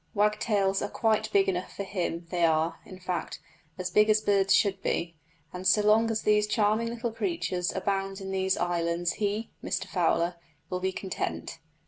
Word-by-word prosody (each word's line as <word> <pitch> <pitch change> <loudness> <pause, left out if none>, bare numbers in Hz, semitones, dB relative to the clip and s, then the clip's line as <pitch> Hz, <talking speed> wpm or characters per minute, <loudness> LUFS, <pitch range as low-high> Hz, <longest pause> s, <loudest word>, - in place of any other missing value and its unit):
Wagtails 205 -2 +2
are 205 - -2
quite 220 0 +1
big 195 -1 +4
enough 185 -1 -2
for 200 - -3
him; 180 -3 -3
they 175 -2 0
are, 160 0 +2
in 185 - -10
fact, 180 -1 -4 0.4
as 180 -1 -3
big 210 +3 +4
as 215 0 +5
birds 200 -2 +2
should 195 -2 +3
be, 170 -4 -2 0.4
and 180 +1 -3
so 210 +3 +4
long 220 +2 +4
as 220 -1 -1
these 210 0 +3
charming 215 +2 +1
little 235 0 -3
creatures 225 - -2
abound 195 0 -1
in 190 -1 -6
these 190 0 +1
islands 170 0 0
he 210 +2 -1
(Mr - - -2
Fowler) 175 -1 +1 0.3
will 180 - -1
be 190 +1 -1
content. 85 - -4
195 Hz, 175 wpm, -28 LUFS, 180-210 Hz, 0.4 s, as